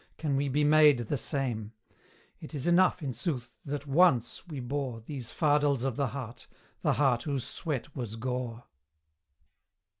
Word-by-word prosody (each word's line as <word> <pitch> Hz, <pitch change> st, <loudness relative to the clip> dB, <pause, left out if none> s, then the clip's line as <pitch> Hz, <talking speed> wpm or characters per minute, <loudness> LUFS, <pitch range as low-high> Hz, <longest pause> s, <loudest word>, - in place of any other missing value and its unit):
can 150 Hz, -4 st, -1 dB
we 140 Hz, +1 st, +1 dB
be 145 Hz, +3 st, +1 dB
made 150 Hz, -2 st, +6 dB
the 120 Hz, +4 st, -2 dB
same: 120 Hz, -4 st, -2 dB, 0.7 s
It -, -, -9 dB
is 140 Hz, -, -4 dB
enough, 175 Hz, 0 st, +4 dB
in 135 Hz, -3 st, -2 dB
sooth, 120 Hz, -2 st, -4 dB
that 145 Hz, 0 st, -4 dB
ONCE 140 Hz, -2 st, +3 dB
we 150 Hz, -5 st, -6 dB
bore 130 Hz, -1 st, -3 dB
These 120 Hz, +1 st, -7 dB
fardels 145 Hz, -4 st, +2 dB
of 135 Hz, -3 st, -1 dB
the 140 Hz, 0 st, 0 dB
heart 125 Hz, -2 st, -7 dB, 0.3 s
the -, -, +2 dB
heart 135 Hz, -5 st, +2 dB
whose 140 Hz, -2 st, -2 dB
sweat 150 Hz, -3 st, -4 dB
was 120 Hz, -5 st, -4 dB
gore. 120 Hz, 0 st, -4 dB
135 Hz, 155 wpm, -30 LUFS, 120-145 Hz, 0.7 s, made